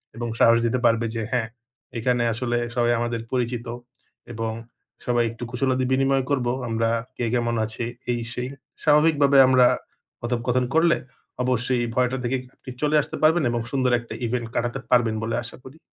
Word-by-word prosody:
এবং 120 0 -4
সাহস 115 0 +6
দিতে 120 +2 +1
পারবে 115 0 +3
যে 115 - -1
হ্যাঁ 120 -3 0 0.5
এখানে 120 +1 +1
আসলে 120 0 -1 0.2
সবাই 120 -1 +2
আমাদের 120 -1 -2
পরিচিত 120 -1 -1 0.7
এবং 115 0 -2 0.5
সবাই 120 -1 +2
একটু 115 +1 -9
কুশলাদি 130 0 0
বিনিময় 135 0 +2
করব 130 -4 0 0.2
আমরা 115 0 0 0.3
কে 120 - -1
কেমন 120 -1 +1
আছে 110 +2 -5 0.3
এই 120 - -1
সেই। 125 +1 -4 0.3
স্বাভাবিকভাবে 150 -2 +4
আমরা 130 -1 +6 0.5
কথোপকথন 125 +1 0
করলে 170 +1 +4 0.5
অবশ্যই 125 0 0
ভয়টা 130 +1 +1
থেকে 130 +2 0 0.2
আপনি - - -12
চলে 150 +1 +2
আসতে - - -7
পারবেন 160 0 +4
এবং 120 -1 -1
সুন্দর 130 -2 +1
একটা 120 - -9
ইভেন্ট 120 0 -2
কাটাতে 120 +3 -1
পারবেন 120 -3 +3
বলে 115 - -1
আশা 115 - -8
করি। 130 +4 -12
125 Hz, 160 wpm, -24 LUFS, 115-130 Hz, 0.7 s, সাহস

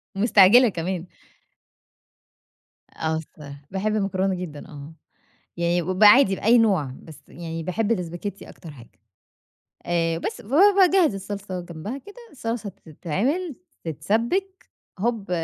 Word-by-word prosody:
ومستعجلة 220 +3 +6
كمان. 180 -1 -4 1.8
آه، 160 0 -2
الصراحة 145 -2 -10
باحب 210 +3 -1
المكرونة 195 -2 0
جدًا 165 -5 -8
آه، 145 +1 -11 0.6
يعني 170 +1 +1
ب 185 +4 0
عادي 205 -2 +7
بأي 235 +5 +4
نوع 190 - +2
بس 160 -3 -13
يعني 165 -1 -7
باحب 205 +6 -1
الاسباجيتي 180 0 -4
أكتر 165 -4 -12
حاجة. 120 -5 -15 1.0
آآ، 165 -1 0
بس - - -5
فباجهز 365 - +4
الصلصة 195 -1 -6
جنبها 175 - -7
كده، 410 +7 -14 0.2
الصلصة 230 -5 -4 0.2
تتعمل 245 - -2 0.3
تتسبك، 235 - -2 0.3
هُب 220 -3 -2
195 Hz, 115 wpm, -23 LUFS, 165-230 Hz, 1.8 s, عادي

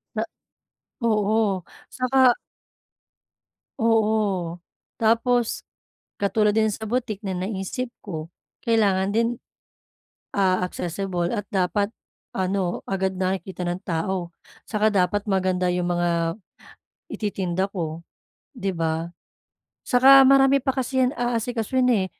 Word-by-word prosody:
Na - - 0 0.8
Oo, 210 -3 +1 0.3
saka 255 -1 +4 1.5
Oo. 210 -6 +1 0.4
Tapos 230 +1 +2 0.5
katulad 210 +1 +1
din 220 -1 +3
sa 220 +1 -5
boutique 230 -3 -2
na 190 -3 -3
naisip 195 +6 -3
ko 165 -5 -6 0.3
kailangan 200 -4 +2
din, 230 +2 +2 1.1
ah, 185 -2 +2
accessible 180 0 -3
at 205 -3 -2
dapat 200 +3 +1 0.4
ano 185 -1 -1
agad 190 0 0
nakikita 185 0 -3
ng 175 +1 -3
tao, 175 0 -2 0.3
'saka 215 0 +2
dapat 205 0 +1
maganda 185 -2 +1
yung 180 0 0
mga 170 +1 0 0.7
ititinda 190 -3 -2
ko 165 -3 -4 0.5
'di 195 -4 -2
ba? 165 0 -2 0.8
Saka 270 +2 +8
marami 275 0 +5
pa 265 - +2
kasi 260 0 0
yan 250 - +1
aasikasuhin, 240 +1 0 0.2
eh. - - -3
200 Hz, 105 wpm, -24 LUFS, 180-225 Hz, 1.5 s, Saka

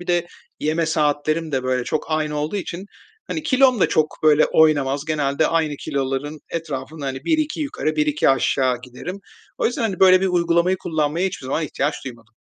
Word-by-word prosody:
Bir 175 - -10
de 175 -1 +1 0.3
yeme 160 +2 0
saatlerim 155 +1 0
de, 130 -1 0
böyle, 130 -1 -1
çok 155 - -2
aynı 155 -1 -1
olduğu 150 +7 -2
için, 190 0 -5 0.4
hani, 315 - -4
kilom 260 -6 +3
da - - +4
çok 155 -1 +1
böyle 155 -1 +5
oynamaz. 145 -2 +3
Genelde 150 -1 0
aynı 160 -3 0
kiloların 140 +2 -3
etrafında, 150 -2 -5
hani, 135 0 -5
1-2 310 -1 0
yukarı, 155 - -2
1-2 150 -1 +2
aşağı 130 -2 +2
giderim. 130 +10 -8 0.4
O - - +2
yüzden, 245 - -2
hani, 200 -5 -2
böyle 185 -1 +7
bir 190 - +1
uygulamayı 175 0 +2
kullanmaya 160 +1 -1
hiçbir 175 -8 -6
zaman 155 +4 -1
ihtiyaç 145 0 -1
duymadım. 115 -3 -11
155 Hz, 180 wpm, -21 LUFS, 140-175 Hz, 0.4 s, böyle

